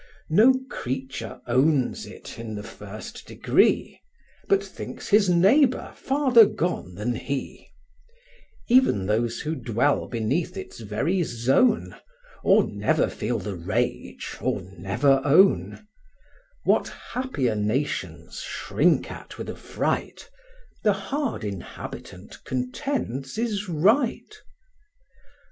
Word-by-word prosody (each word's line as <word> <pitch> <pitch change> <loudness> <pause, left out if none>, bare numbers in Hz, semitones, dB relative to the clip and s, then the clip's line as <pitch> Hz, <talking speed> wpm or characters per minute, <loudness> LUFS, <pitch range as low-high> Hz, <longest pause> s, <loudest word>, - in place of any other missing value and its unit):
No 230 +10 +6
creature 130 - -5
owns 130 +2 +2
it - - -10
in 115 -2 -6
the 105 - -6
first 105 +1 -9
degree, - - +2 0.5
But 395 -1 +3
thinks - - -8
his 205 -2 +5
neighbour 235 - +4
farther 265 -5 +5
gone 165 - -3
than 105 +5 -2
he; 135 +3 -5 1.0
Even 240 - +4
those 115 +3 0
who 155 - -2
dwell 130 0 0
beneath 155 - -1
its 190 - -8
very 115 - -1
zone, 135 - +2 0.5
Or - - +5
never - - +1
feel 120 - -2
the 100 0 -4
rage, 105 +8 -3
or 100 - -1
never 120 +10 +2
own; 190 +8 +4 0.8
What - - +3 0.2
happier 200 - -1
nations 110 +8 -2
shrink - - +1
at - - -10
with - - -5
affright, - - -3 0.5
The 210 -2 +3
hard 240 - -3
inhabitant 95 -1 -8
contends 130 - -3
is 210 -4 -2
right. 220 - +2
140 Hz, 105 wpm, -25 LUFS, -, 1.0 s, No